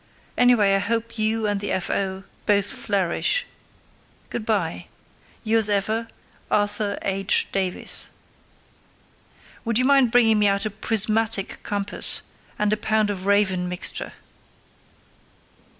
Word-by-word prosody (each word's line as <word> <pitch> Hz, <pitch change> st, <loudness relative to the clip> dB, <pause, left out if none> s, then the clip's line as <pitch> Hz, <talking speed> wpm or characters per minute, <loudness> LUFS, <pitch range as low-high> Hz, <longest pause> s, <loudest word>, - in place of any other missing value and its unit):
Anyway, 240 Hz, -5 st, +4 dB
I 195 Hz, -, +3 dB
hope 230 Hz, +2 st, -2 dB
you 220 Hz, +1 st, +1 dB
and 205 Hz, -1 st, 0 dB
the 205 Hz, -, -3 dB
F.O. 190 Hz, +1 st, -2 dB, 0.2 s
both 205 Hz, -1 st, +2 dB
flourish. 200 Hz, -, 0 dB, 0.9 s
Good 220 Hz, -, -5 dB
bye. 170 Hz, -, -1 dB, 0.6 s
Yours 220 Hz, -1 st, +3 dB
ever, 215 Hz, +3 st, 0 dB, 0.4 s
Arthur 205 Hz, 0 st, 0 dB
H. 195 Hz, 0 st, +2 dB
Davies. 190 Hz, -2 st, -1 dB, 1.5 s
Would 230 Hz, -1 st, +1 dB
you 255 Hz, -, +2 dB
mind 275 Hz, -2 st, +4 dB
bringing 225 Hz, -2 st, +4 dB
me 205 Hz, -, +4 dB
out 200 Hz, +1 st, +1 dB
a 215 Hz, -, -2 dB
prismatic 215 Hz, 0 st, 0 dB
compass, 200 Hz, -1 st, +1 dB, 0.3 s
and 210 Hz, 0 st, +1 dB
a -, -, 0 dB
pound 215 Hz, -1 st, 0 dB
of 190 Hz, -1 st, -6 dB
Raven 190 Hz, -3 st, +1 dB
mixture? 180 Hz, 0 st, -4 dB
205 Hz, 120 wpm, -23 LUFS, 195-225 Hz, 1.5 s, Anyway